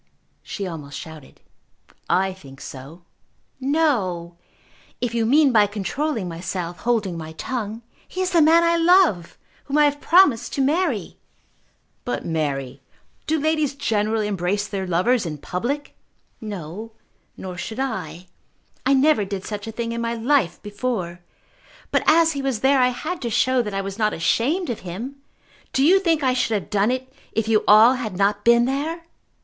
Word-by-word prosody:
she 200 - -5
almost 150 -6 -7
shouted. 160 -3 -11 0.7
"I 190 0 +2
think 135 -8 -14
so." 140 +7 -10 0.6
"No; 235 - 0 0.6
if 245 -2 -2
you 230 -1 +1
mean 285 +2 +5
by 210 -3 +5
controlling 220 +3 -2
myself, 175 0 -5
holding 215 -8 -1
my 160 0 -8
tongue. 225 +4 -4 0.2
He 370 - -8
is 370 0 0
the 340 -3 +4
man 325 +2 +6
I 335 0 +3
love, 335 - +3 0.3
whom 285 +1 -1
I 300 - +6
have 290 0 0
promised 330 -10 +4
to 275 - 0
marry." 290 - -1 0.8
"But, 245 - -3
Mary, 140 -5 -2 0.5
do 315 +1 +1
ladies 310 -2 0
generally 220 -4 0
embrace 200 +1 -1
their 195 -2 -4
lovers 185 +8 +2
in 155 -4 -5
public?" 245 - -4 0.5
"No; 210 +1 -7 0.4
nor 185 -1 -7
should 220 +6 -6
I. 180 - -4 0.6
I 275 +2 +3
never 275 -4 +4
did 195 -1 -5
such 210 0 -5
a - - -4
thing 230 +1 -4
in 235 0 -3
my 235 0 -2
life 240 - +1
before. 205 -5 -3 0.7
But - - +2
as 325 +1 +5
he 280 -3 -3
was 265 -5 -2
there 270 +1 +4
I 250 - +5
had 310 +8 -4
to 240 - -2
show 255 +3 +2
that 210 -4 -5
I 195 - 0
was 195 +2 -6
not 215 -1 +2
ashamed 265 - 0
of 230 - -5
him! 220 +11 -7 0.6
Do 265 - +2
you 375 +5 +6
think 330 -5 +1
I 260 -1 +3
should 225 -4 +1
have - - -14
done 205 +1 +2
it 260 +1 -3 0.2
if 225 -1 -1
you 220 -1 +3
all 220 +4 +8
had 225 -7 -4
not 200 +1 +1
been 235 0 +5
there?" 310 +6 -3
225 Hz, 170 wpm, -22 LUFS, 190-275 Hz, 0.8 s, all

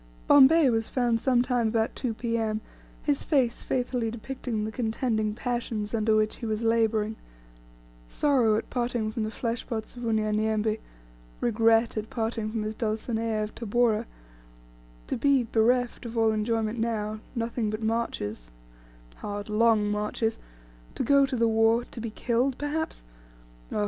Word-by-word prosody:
Bombay 285 +2 +7
was 225 -1 0
found 240 -3 +1
some 250 -2 +3
time 245 -3 +1
about 220 0 0
2 240 -4 -2
P.M., 225 -1 -1 0.4
his 290 -2 +1
face 260 -6 +1
faithfully 245 -2 -1
depicting 235 -1 -4
the 220 - -4
contending 220 -2 -1
passions 235 -3 -3
under 220 -1 +2
which 215 0 +1
he 235 - -6
was 215 +1 -2
labouring 225 -1 +1 0.9
sorrow 250 - +2
at - - -4
parting 240 -3 -1
from 225 - -3
the 215 - -1
fleshpots 230 0 -4
of 245 - -8
Unyanyembe 215 0 +1 0.6
regret 225 0 +3
at 215 0 -3
parting 225 -1 -2
from 220 -1 -2
his 215 +1 -3
Dulcinea 220 0 -1
of 210 - -6
Tabora 230 0 +1 1.0
to - - -2
be, 275 +1 +3
bereft 240 +2 +1
of 230 0 -7
all 225 -1 +4
enjoyment 220 +1 -1
now, 215 -2 -2 0.2
nothing 230 -1 -1
but 215 +1 -4
marches 220 - -2 0.7
hard, 205 0 -5
long 215 -1 +3
marches 210 +2 -1 0.6
to - - -1
go 280 +2 +4
to 265 - -3
the 230 -1 +3
war 225 +1 +3
to 230 - -7
be 230 - -3
killed, 245 +4 0
perhaps, 295 - -3 0.7
Oh! - - -1
225 Hz, 150 wpm, -27 LUFS, 215-240 Hz, 1.0 s, Bombay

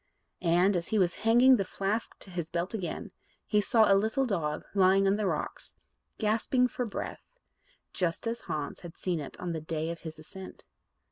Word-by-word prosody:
And, 180 +3 +3
as 170 -1 -1
he 220 - 0
was 180 -3 +3
hanging 245 +4 +6
the 195 - +1
flask 200 +4 -2
to 190 - -10
his 170 -2 -4
belt 175 +4 -2
again, 190 -6 -4 0.3
he 210 -1 +2
saw 220 +1 +4
a 200 - +5
little 220 +7 +2
dog 160 -9 -2
lying 195 0 +5
on 195 +1 +4
the 210 -1 0
rocks, - - -4 0.4
gasping 230 +4 +2
for 250 0 -3
breath 210 - -6 0.6
just 175 0 -1
as 230 +1 -2
Hans 150 -2 -3
had 170 -2 -10
seen 180 -3 -1
it 145 - -8
on 175 - -3
the 160 - -3
day 160 +1 -2
of 170 - -6
his 160 -1 -8
ascent. 185 +5 -10
195 Hz, 190 wpm, -30 LUFS, 170-220 Hz, 0.6 s, hanging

